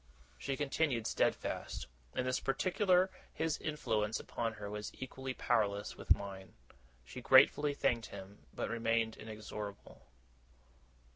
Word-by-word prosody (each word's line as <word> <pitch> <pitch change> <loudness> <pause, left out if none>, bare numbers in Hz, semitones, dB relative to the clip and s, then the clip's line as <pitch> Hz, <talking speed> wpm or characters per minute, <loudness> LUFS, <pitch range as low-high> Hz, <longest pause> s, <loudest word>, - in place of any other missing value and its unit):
She 135 -1 -2
continued 135 -4 +1
steadfast. - - 0 0.3
In 125 - 0
this 130 0 +1
particular, 180 +6 +3 0.2
his 160 -1 -1
influence 110 -8 0
upon 115 -1 -2
her 105 -1 -7
was 105 +1 -4
equally 130 0 -5
powerless 105 -4 +1
with - - +4
mine. 95 -1 -8 0.5
She - - -8
gratefully 140 +2 +6
thanked 115 -5 +1
him 100 +1 -11
but - - -3
remained 115 -1 +1
inexorable. 105 -2 -8
115 Hz, 120 wpm, -35 LUFS, 105-135 Hz, 0.5 s, gratefully